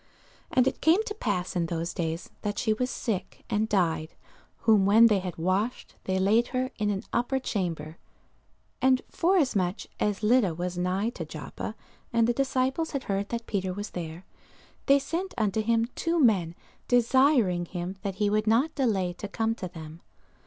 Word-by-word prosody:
And 250 - +4
it 265 - -2
came 340 +7 +4
to 430 - -4
pass 185 - -2
in 170 -2 0
those 170 0 -3
days, 165 0 -3
that 205 -1 -3
she 220 - +1
was 250 +4 -1
sick, 195 -8 -4
and 215 +1 +1
died: 165 -5 0 0.5
whom 215 -4 +4
when 220 +3 +7
they 210 -4 +4
had 180 -2 -6
washed, 190 +8 -1
they 190 0 0
laid 210 +5 +3
her 255 0 -2
in 210 -1 +1
an 195 -1 -2
upper 245 +3 +1
chamber. 170 - -3 0.8
And 260 0 +3
forasmuch 260 - +1 0.2
as 210 0 -1
Lydda 210 -6 +3
was 180 +1 -3
nigh 185 +5 0
to - - -6
Joppa, - - -7 0.4
and 230 -1 +3
the 240 - +2
disciples 270 +4 0
had 275 - -2
heard 200 0 -2
that 235 -1 -3
Peter 190 -2 -2
was 205 +1 -5
there, 170 0 -6 0.6
they 275 - +7
sent 335 +7 -3
unto 215 -1 +1
him 230 +1 +2
two 335 0 0
men, 190 - +3 0.3
desiring 245 - +3
him 175 +1 -5
that 200 -2 -3
he 205 +1 +1
would 215 +1 +1
not 255 +9 +3
delay 200 - 0
to 205 +4 -7
come 225 +2 0
to 195 -5 -6
them. 165 -2 -10
210 Hz, 175 wpm, -27 LUFS, 180-250 Hz, 0.8 s, when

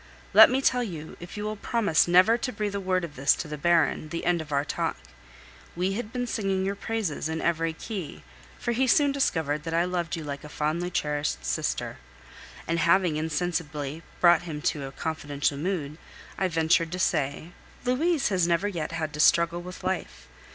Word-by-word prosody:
Let - - +10
me 265 +1 0
tell 250 -2 +3
you, 165 -9 -6
if 175 +4 -9
you 210 - -3
will 215 0 -3
promise 205 -7 +2
never 185 +6 +6
to 255 +2 -3
breathe 210 -3 -3
a 200 - -2
word 185 -1 0
of 150 -4 -11
this 135 +2 +3
to 165 - -5
the 150 - -5
Baron, 160 0 +2
the 170 - -4
end 175 -1 +2
of 155 -1 -10
our 140 0 +1
talk. - - -2 0.8
We 185 +3 0
had 220 +1 -4
been 245 0 -2
singing 195 -5 -1
your 195 - 0
praises 200 -7 -3
in 160 0 -2
every 165 -1 0
key, 185 -3 -6 0.3
for - - -2
he 255 +3 +1
soon 285 +3 +4
discovered 160 - 0
that 165 +1 -3
I 170 +1 +3
loved 175 -2 -2
you 165 - -6
like 140 -1 -6
a 150 - -9
fondly 155 +4 -1
cherished 145 - -2
sister, - - -2 0.7
and 165 0 0
having 170 -1 +3
insensibly 155 -2 -2 0.2
brought 175 -2 +6
him 160 -4 -6
to 145 -3 -6
a - - -8
confidential 145 -1 -2
mood, 160 -3 -3 0.4
I 190 - 0
ventured 165 0 +2
to - - -2
say: 155 -2 -1 0.3
"Louise 290 +4 +1
has 180 -4 +2
never 175 +4 +1
yet 170 -5 -4
had 160 -2 -3
to 150 - -7
struggle 170 +2 +4
with 180 +1 -9
life. 70 - -3
170 Hz, 195 wpm, -27 LUFS, 155-195 Hz, 0.8 s, Let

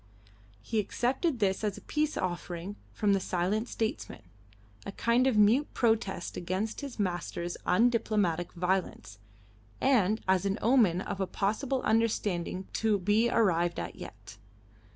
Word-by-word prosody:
He 220 - -1
accepted 255 - 0
this 200 -2 0
as 205 -2 -1
a - - -10
peace 305 0 -1
offering 180 +1 -4 0.2
from 205 -2 +1
the 195 - +2
silent 190 +5 -1
statesman 220 -1 -4 0.6
a - - -6
kind 235 +5 +2
of 250 -5 +2
mute 225 +8 +4
protest 215 -6 0
against 190 +8 -3
his 280 -3 -7
master's 175 -3 -3
undiplomatic 210 -5 +2
violence, 180 - -2 0.6
and 220 -5 +3
as 190 -1 +3
an 200 0 0
omen 220 -7 +3
of 195 0 -4
a 190 - 0
possible 245 +8 -1
understanding 205 -5 0
to 220 -2 +1
be 210 +5 +2
arrived 175 -7 +2
at - - -5
yet. 110 +1 -11
205 Hz, 135 wpm, -29 LUFS, 180-230 Hz, 0.6 s, mute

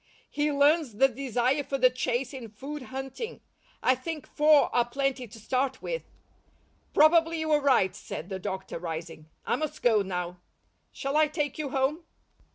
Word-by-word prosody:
He 295 0 0
learns 290 -3 +3
the 270 +5 +5
desire 260 +2 0
for 275 - -2
the 255 -1 +5
chase 255 +1 -2
in 250 -4 -7
food 280 +8 -7
hunting; 270 - -6 0.4
I 255 - +5
think 305 +4 -5
four 300 -1 +4
are 240 - +5
plenty 265 +1 -2
to 225 +2 -13
start 260 +4 -1
with." - - -4 0.8
"Probably 330 +1 +5
you 315 0 -1
are 300 -1 +4
right," 255 -9 +3
said 160 - -7
the 190 -1 -4
doctor, 190 -3 -5
rising. 165 -2 -6 0.2
"I - - +1
must 310 -2 -4
go 225 -4 +5
now. 180 -2 -4 0.5
Shall 275 +1 -3
I 310 0 +5
take 295 -1 -3
you 295 -2 -2
home?" 275 +5 0
270 Hz, 165 wpm, -28 LUFS, 230-300 Hz, 0.8 s, the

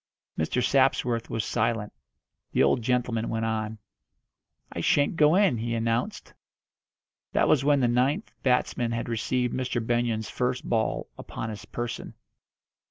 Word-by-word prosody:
Mr. 100 +10 0
Sapsworth 125 -4 +2
was 110 -2 -2
silent. 110 -2 -1 0.6
The - - +4
old 120 - +3
gentleman 120 -1 0
went 115 0 -1
on: 110 -1 -2 1.0
"I - - -3
shan't 145 +3 +2
go 155 +1 +5
in," 190 - +3
he 115 +1 -2
announced. 115 +1 -2 1.0
That - - +3
was 140 -3 +4
when 145 -1 +3
the 125 - +3
ninth 130 - +1
batsman 125 -2 +1
had 115 - -3
received 120 +2 -1
Mr. 130 -1 -1
Benyon's 120 -2 0
first 125 0 -2
ball 110 -2 0
upon 110 - -5
his 105 -1 -8
person. 120 +1 -5
120 Hz, 140 wpm, -27 LUFS, 115-130 Hz, 1.0 s, go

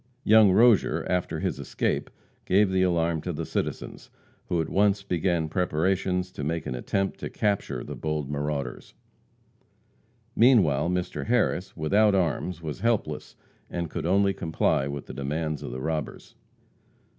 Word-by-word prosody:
Young 110 -2 +6
Rozier, 115 +2 +4
after 90 -1 -1
his - - -2
escape, - - -2 0.4
gave 100 +1 +3
the 95 0 +2
alarm 85 -3 +1
to 90 - -3
the 80 0 -4
citizens, - - -4 0.4
who 85 - 0
at 80 - -1
once 100 0 +2
began 85 -3 0
preparations 90 +2 0
to 75 - -6
make 80 +2 -2
an - - -3
attempt 95 +10 -2
to - - -5
capture 100 - -1
the - - -7
bold 75 -2 -3
marauders. 70 -2 -4 1.4
Meanwhile 90 - +4
Mr. 90 +2 -3
Harris, 110 -7 0
without 100 +6 +3
arms, 90 -1 -1
was 75 -2 -5
helpless, 115 -2 -1 0.3
and 85 -3 -4
could - - -3
only 100 +2 +3
comply 80 -6 0
with 70 0 -5
the - - -9
demands 75 +2 -3
of - - -6
the 65 +1 -5
robbers. 75 -3 -4
85 Hz, 145 wpm, -26 LUFS, 75-95 Hz, 1.4 s, Young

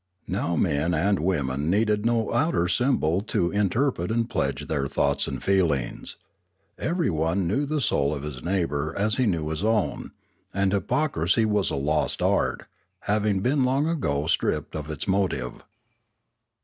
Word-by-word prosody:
Now 85 - -1
men 80 0 +1
and 100 +5 +2
women 75 -4 0
needed 105 +2 +2
no 115 -2 0
outer 120 - +2
symbol 90 - +1
to 85 -6 0
inter 105 +7 +2
pret 90 -6 -5
and 115 +1 0
pledge - - -2
their 70 -3 -1
thoughts 70 +1 +1
and - - -5
feelings. 85 -10 0 0.6
Everyone 95 - 0
knew 135 +11 0
the 155 +1 0
soul 70 - +1
of 70 - -6
his 70 -4 -6
neighbour 80 -5 -1
as 105 +2 +1
he 130 -2 +2
knew 80 -6 0
his 80 +4 -3
own, 110 -3 0 0.5
and 100 0 +1
hypocrisy 105 - +1
was 105 -2 +1
a - - -2
lost 75 +3 0
art, - - +1 0.4
having 105 -1 +1
been 135 +5 +2
long 135 +4 +2
ago 75 - -1
stripped 80 - 0
of 75 -1 -5
its 75 +3 -4
motive. 95 -11 -1
95 Hz, 155 wpm, -25 LUFS, 75-110 Hz, 0.6 s, and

